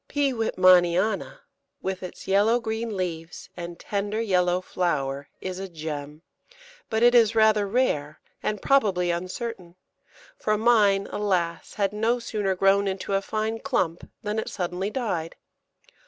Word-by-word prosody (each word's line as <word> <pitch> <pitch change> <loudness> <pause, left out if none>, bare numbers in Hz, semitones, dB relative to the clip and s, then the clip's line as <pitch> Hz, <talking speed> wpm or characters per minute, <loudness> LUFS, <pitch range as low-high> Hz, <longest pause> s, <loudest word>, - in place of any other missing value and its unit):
P. 285 -2 +1
Wittmanniana, 185 - +3 0.4
with 190 -1 -3
its 185 - -9
yellow 205 +5 +4
green 220 -2 -3
leaves 165 -2 -5
and 170 -1 -7
tender 205 +1 -2
yellow 180 -5 +2
flower, 140 -7 -2
is 185 0 -4
a 195 0 -5
gem; 150 -2 -6 0.7
but 220 +1 +1
it 240 0 +6
is 230 -2 +5
rather 215 -2 +4
rare, 155 - 0 0.2
and 210 -2 -2
probably 195 -10 +3
uncertain, 185 +1 -5 0.6
for 215 0 0
mine, 210 -4 +4
alas! 180 -5 -1
had 200 -1 0
no 225 +3 +1
sooner 210 -5 -2
grown 195 +2 +3
into 195 +1 -3
a 195 - +2
fine 220 +2 -2
clump 185 -12 -1
than 210 +1 -1
it - - -4
suddenly 180 +1 -3
died. 205 -10 -3
195 Hz, 140 wpm, -25 LUFS, 175-220 Hz, 0.7 s, it